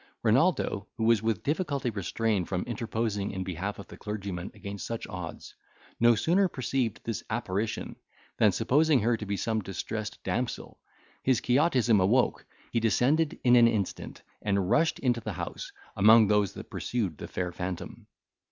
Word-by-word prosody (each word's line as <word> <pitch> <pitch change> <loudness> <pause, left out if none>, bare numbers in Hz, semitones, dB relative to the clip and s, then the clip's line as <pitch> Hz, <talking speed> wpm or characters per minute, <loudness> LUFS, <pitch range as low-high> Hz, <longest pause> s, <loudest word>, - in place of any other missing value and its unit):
Renaldo, 115 - +2
who 115 - -2
was 115 -2 +4
with 110 -3 -1
difficulty 145 -5 -1
restrained 105 -1 -1
from 90 -2 -1
interposing 110 -3 -2
in 95 -1 -4
behalf 95 +3 -4
of 100 - -9
the - - -12
clergyman 100 -4 -5
against 100 -1 -7
such 115 -1 -4
odds, 90 -4 -7 0.5
no 120 0 +6
sooner 175 - +3
perceived 130 - -2
this 115 - -3
apparition, 110 -1 -2 0.4
than, - - +5
supposing 150 -1 +3
her 115 +2 +2
to 105 -2 -6
be 100 0 -1
some 110 +3 -1
distressed 105 +3 -5
damsel, 125 -1 -3 0.4
his 130 -3 +2
Quixotism 125 -5 +3
awoke, 115 +7 +2 0.2
he 115 - +1
descended 135 +8 +2
in 125 -1 +6
an 120 -1 +7
instant, 110 -5 -3 0.2
and 100 -1 0
rushed 155 +7 +3
into 120 -3 0
the 110 -2 -4
house, - - -6 0.2
among 110 +2 +7
those 105 -2 +2
that - - -10
pursued 100 -11 -2
the - - -6
fair 90 -1 -3
phantom. 90 0 -6
110 Hz, 160 wpm, -28 LUFS, 100-120 Hz, 0.5 s, an